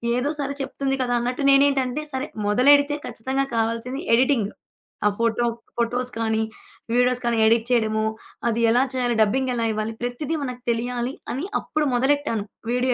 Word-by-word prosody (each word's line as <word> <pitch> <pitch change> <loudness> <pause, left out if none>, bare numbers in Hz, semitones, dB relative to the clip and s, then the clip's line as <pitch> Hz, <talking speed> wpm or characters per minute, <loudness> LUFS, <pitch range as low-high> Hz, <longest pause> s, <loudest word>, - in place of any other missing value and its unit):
ఏదో 250 +4 0
సరే 280 0 -2
చెప్తుంది 270 0 -2
కదా 245 -1 0
అన్నట్టు 245 +4 -2
నేనేంటంటే, 275 0 +3
సరే 265 +1 -3 0.2
మొదలెడితే 285 +7 +5
ఖచ్చితంగా 260 +4 -2
కావాల్సింది 230 +4 -1
ఎడిటింగ్. 240 -4 +2 0.6
ఆ - - +5
ఫోటో 230 0 +1 0.3
ఫోటోస్ 245 +2 0
కానీ, 220 -1 +1 0.5
వీడియోస్ 250 0 +2
కానీ, 235 -1 +1
ఎడిట్ 225 0 +3
చేయడము, 220 -2 +2 0.4
అది 230 0 0
ఎలా 245 +3 +4
చేయాలి, 245 -2 0
డబ్బింగ్ 260 +5 0
ఎలా 230 -1 0
ఇవ్వాలి, 215 +1 -3
ప్రతిది 245 +6 -2
మనకు 250 -2 -6
తెలియాలి 245 +2 -2 0.2
అని 280 +9 -3
అప్పుడు 305 -1 -1
మొదలెట్టాను 265 -4 +1 0.3
వీడియో 250 +1 +2
250 Hz, 150 wpm, -23 LUFS, 230-270 Hz, 0.6 s, మొదలెడితే